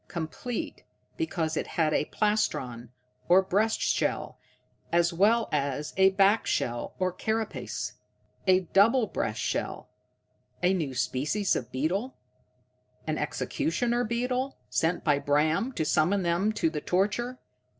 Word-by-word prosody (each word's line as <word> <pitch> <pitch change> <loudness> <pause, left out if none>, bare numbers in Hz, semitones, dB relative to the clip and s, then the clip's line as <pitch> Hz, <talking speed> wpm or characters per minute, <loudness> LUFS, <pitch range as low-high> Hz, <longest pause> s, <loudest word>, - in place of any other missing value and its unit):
Complete, 175 +9 -5 0.3
because 165 - -2
it - - -2
had 155 -2 +3
a - - +2
plastron, 130 - -1 0.4
or 185 +2 +6
breast 210 +4 +1
shell, - - -1 0.5
as 170 0 +3
well 220 +6 +3
as 145 0 -1
a 190 0 +6
back 195 +3 +3
shell, 120 0 -1
or 185 -1 0
carapace. 220 +3 -3 0.5
A 185 0 +5
double 215 +7 +4
breast - - -3
shell! - - -3 0.7
A 180 +2 +4
new 155 -8 -2
species 150 +11 0
of 125 -1 -4
beetle? 180 - -1 0.9
An - - -2
executioner 245 -6 -1
beetle, 250 +3 -1
sent 165 +2 +1
by 145 -3 +3
Bram 155 - +1
to 160 - -1
summon 175 +5 +2
them 175 +5 +1
to 165 -6 0
the 150 -2 -4
torture? 210 +9 0
185 Hz, 130 wpm, -28 LUFS, 155-220 Hz, 0.9 s, or